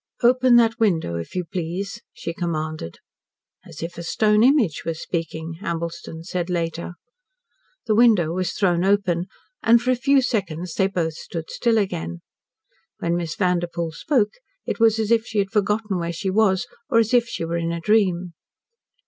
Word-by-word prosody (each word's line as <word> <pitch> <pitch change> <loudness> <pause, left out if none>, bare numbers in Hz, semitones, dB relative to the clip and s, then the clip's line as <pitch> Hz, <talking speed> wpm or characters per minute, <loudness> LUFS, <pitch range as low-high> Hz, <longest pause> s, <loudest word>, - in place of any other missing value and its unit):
"Open 250 +1 +5
that 230 -1 +4
window, 165 - +1
if 85 - -7
you 180 -1 -1
please," 180 +2 -4
she 165 - -6
commanded 155 - -4 0.7
"as - - -9
if 170 +1 -6
a - - -5
stone 210 +5 +2
image 245 - +3
was 165 -1 -3
speaking" 165 -1 -4
Ambleston 170 -2 -5
said 180 0 -3
later. 170 0 -2 0.9
The 220 - +2
window 215 -8 +4
was 180 0 -2
thrown 180 -3 +1
open, 190 -3 +1 0.3
and 235 +1 +5
for 250 +2 0
a - - +3
few 270 +2 +3
seconds 180 -7 -2
they 190 - +2
both 170 -4 -1
stood 165 0 -7
still 230 -2 +1
again. 85 - -2 0.8
When 170 0 -1
Miss 170 -2 -3
Vanderpoel 175 -3 0
spoke, 215 - +1 0.3
it - - -3
was 225 -1 +4
as 220 0 -1
if 230 -1 +3
she 220 - -4
had 195 -1 +1
forgotten 210 -1 0
where 170 0 -2
she 190 +3 -3
was, 200 0 +3 0.2
or 245 - +3
as 225 +1 +3
if 240 -1 +4
she 165 - -4
were 170 +1 -2
in 170 0 -1
a 170 - -3
dream. 185 -3 +1
180 Hz, 175 wpm, -23 LUFS, 170-220 Hz, 0.9 s, Open